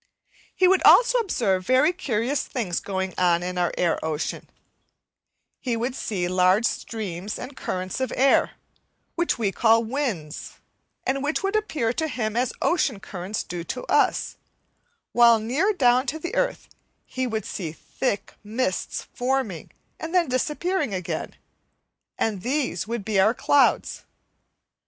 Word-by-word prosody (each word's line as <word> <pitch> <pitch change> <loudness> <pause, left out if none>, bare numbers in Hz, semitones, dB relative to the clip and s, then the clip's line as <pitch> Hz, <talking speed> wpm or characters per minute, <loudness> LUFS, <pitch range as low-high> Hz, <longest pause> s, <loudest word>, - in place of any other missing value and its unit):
He 370 - +4
would 380 +1 +4
also - - +6
observe 210 - 0
very 260 - +3
curious 265 -5 -1
things 205 -10 -2
going 190 -1 -3
on 175 -1 +3
in 180 0 -3
our 175 -1 +1
air 175 -2 +1
ocean; 155 -1 -3 1.1
he 240 -3 -2
would 240 +3 -2
see 190 -8 -2
large 185 +4 +3
streams 205 -4 -3
and 260 +2 -8
currents 185 -1 -4
of 260 - -1
air, 270 +1 +3 0.6
which 345 0 0
we 215 -4 0
call 230 +2 +4
winds, 220 - -3 0.5
and 270 +1 0
which 300 +6 -1
would 390 +2 0
appear 300 - 0
to 315 +5 -1
him 225 -6 -3
as 245 0 +1
ocean 290 - +1
currents 195 +1 -5
do 175 -1 -5
to 250 - -5
us, - - +1 0.7
while 235 -1 +6
near 265 - +1
down 255 -7 +3
to 305 - -2
the 345 +3 -6
earth - - -1 0.4
he 260 0 -3
would 220 -3 -3
see 170 -6 -4
thick 205 +6 -3
mists 215 -2 -2
forming 245 - -2 0.3
and 330 +3 -5
then 350 -3 +4
disappearing 300 - -1
again, 180 -2 -4 0.8
and 210 -4 -1
these 265 0 -1
would 230 -3 -4
be 210 -3 +1
our 215 +5 +4
clouds. 285 +2 +2
235 Hz, 145 wpm, -24 LUFS, 190-280 Hz, 1.1 s, also